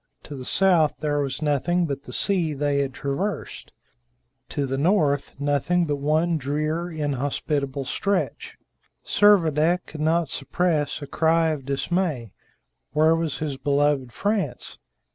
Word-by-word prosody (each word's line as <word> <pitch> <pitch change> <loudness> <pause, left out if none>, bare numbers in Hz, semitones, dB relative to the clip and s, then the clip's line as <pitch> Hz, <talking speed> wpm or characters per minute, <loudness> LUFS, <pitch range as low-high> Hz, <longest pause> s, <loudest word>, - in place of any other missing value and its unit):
To 145 - -8
the 130 -2 -7
south 175 -4 +3
there 145 -1 0
was 140 +2 -2
nothing 170 +5 +1
but 140 -2 -5
the - - -9
sea 175 -7 +1
they 145 0 0
had 140 -1 -1
traversed; 145 +8 -4 0.8
to 145 -2 -1
the 135 0 -2
north, 150 -4 +1
nothing 145 +5 +1
but 145 -2 -1
one 155 +3 +1
drear, 155 +5 -2
inhospitable 140 -2 -2
stretch. 200 +7 -2 0.5
Servadac 175 -4 +3
could 155 - -8
not 165 +1 +2
suppress 150 +1 -1
a - - -4
cry 160 +3 +2
of 150 -4 -3
dismay. 140 - -1 0.6
Where 155 +2 +4
was 165 -3 -2
his 145 -3 -3
beloved 140 -2 +1
France? 205 - -2
150 Hz, 135 wpm, -24 LUFS, 140-170 Hz, 0.8 s, Where